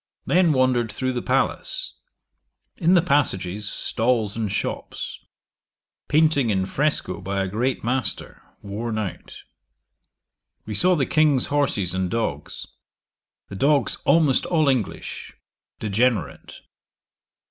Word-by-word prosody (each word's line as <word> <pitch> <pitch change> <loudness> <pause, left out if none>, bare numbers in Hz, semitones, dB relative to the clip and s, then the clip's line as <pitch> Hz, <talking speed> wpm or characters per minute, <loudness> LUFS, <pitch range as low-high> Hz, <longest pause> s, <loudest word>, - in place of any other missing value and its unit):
Then 175 -2 +3
wandered 130 -4 +2
through 130 +4 -2
the 120 - -2
palace. - - 0 0.8
In 175 +3 +3
the 170 - +4
passages, 105 - 0
stalls 110 -3 +1
and 110 -3 -2
shops. 105 - -4 0.9
Painting 150 -5 +3
in 95 -3 +1
Fresco 150 +3 -1
by 95 +1 -2
a - - -2
great 120 +7 -1
master, 120 -3 -2 0.2
worn 110 +3 -4
out. 105 -5 -6 1.2
We 105 - -5
saw 180 - +3
the 140 -5 +1
King's 150 -4 +3
horses 110 -11 +1
and 95 -1 -1
dogs. 80 -11 -3 0.8
The - - -7
dogs 140 +7 +1
almost 150 -6 +3
all 155 -4 +2
English. 125 -6 -3 0.4
Degenerate. 110 +3 -1
120 Hz, 115 wpm, -23 LUFS, 100-145 Hz, 1.2 s, the